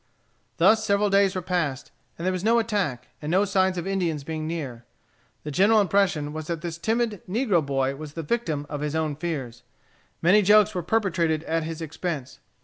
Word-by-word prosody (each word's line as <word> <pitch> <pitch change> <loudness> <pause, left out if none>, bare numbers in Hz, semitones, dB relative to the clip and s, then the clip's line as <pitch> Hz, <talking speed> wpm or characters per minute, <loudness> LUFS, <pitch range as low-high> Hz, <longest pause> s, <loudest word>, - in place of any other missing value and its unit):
Thus 220 0 +5
several 205 -1 +2
days 195 -1 +3
were 185 - -3
passed, 165 -7 -2 0.3
and 170 - -5
there 185 - +2
was 185 -1 -3
no 230 +2 +4
attack, 200 - -1
and 150 - -4
no 190 +4 +3
signs 190 -2 +1
of 175 - -3
Indians 175 -7 -1
being 155 +1 -4
near. 140 -8 -5 0.6
The 150 - -5
general 205 +8 +4
impression 185 -7 +1
was 155 0 -6
that 170 -2 -3
the 170 - -3
timid 220 +4 -1
negro 205 - +2
boy 135 -1 -1
was 150 0 -9
the 165 - -5
victim 155 -6 -2
of 145 -1 -5
his 150 +1 -2
own 155 -2 -1
fears. 140 -7 -4 0.6
Many 190 +5 +5
jokes 210 +1 +5
were 180 - -2
perpetrated 170 -5 0
at 165 -1 -1
his 165 0 -5
expense. 155 -3 -5
170 Hz, 190 wpm, -25 LUFS, 155-200 Hz, 0.6 s, Thus